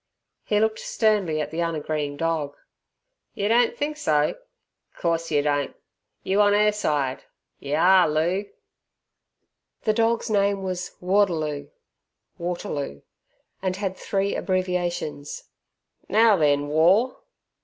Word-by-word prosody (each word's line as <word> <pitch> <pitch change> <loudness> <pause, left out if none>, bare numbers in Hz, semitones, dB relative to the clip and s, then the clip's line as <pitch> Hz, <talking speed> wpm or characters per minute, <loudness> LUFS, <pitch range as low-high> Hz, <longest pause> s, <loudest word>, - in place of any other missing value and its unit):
He 210 - +1
looked 220 0 +1
sternly 205 -8 +1
at - - -4
the 165 +2 -2
unagreeing 155 -3 -2
dog. 155 -3 -1 0.8
"Yer 200 +1 -1
don't 235 +1 +3
think 300 +1 -2
so! 150 - +1 0.6
Course 165 -1 -1
yer 145 -2 +2
don't. 145 -1 -1 0.5
You 195 +2 +2
on 205 0 +4
'er 210 0 +4
side? 145 -10 -1 0.3
Yer 140 +2 -2
are, 180 0 +5
Loo!" 175 +7 0 1.3
The 215 - +2
dog's 230 +1 +1
name 200 -2 +1
was 180 -1 -4
"Warderloo" 165 -7 0 0.7
(Waterloo) 150 - -4 0.6
and 185 -1 -1
had 195 -1 -3
three 195 +1 -1
abbreviations. 175 -5 -2 0.7
"Now 220 +1 +5
then, 145 -4 +2
War!" 180 - +3
180 Hz, 115 wpm, -24 LUFS, 150-205 Hz, 1.3 s, are